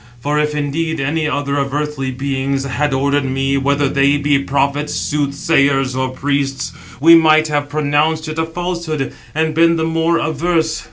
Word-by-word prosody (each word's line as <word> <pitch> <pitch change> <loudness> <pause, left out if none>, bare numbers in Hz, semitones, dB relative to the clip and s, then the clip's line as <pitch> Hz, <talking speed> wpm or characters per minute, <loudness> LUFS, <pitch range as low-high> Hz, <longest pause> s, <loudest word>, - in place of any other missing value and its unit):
For 145 +4 -1
if 150 0 0
indeed 160 +2 -2
any 150 +3 -1
other 145 -1 -2
of 140 0 -2
earthly 150 -3 -2
beings 135 +1 -2
had 140 +2 -1
ordered 140 +2 +1
me, 135 +1 -1
whether 140 +1 +1
they 140 +1 +2
be 145 -1 +2
prophets, 140 +2 -1
soothsayers, 140 -2 +1
or 130 0 -1
priests, 135 +1 -2 0.3
we 165 +4 +7
might 155 -1 +5
have 145 -1 -1
pronounced 155 +2 0
it 155 +1 -4
a 160 - +1
falsehood, 170 -4 -3 0.2
and 160 0 0
been 165 +1 +4
the 160 - -1
more 165 +1 +1
averse. 160 +1 0
145 Hz, 165 wpm, -17 LUFS, 140-160 Hz, 0.3 s, we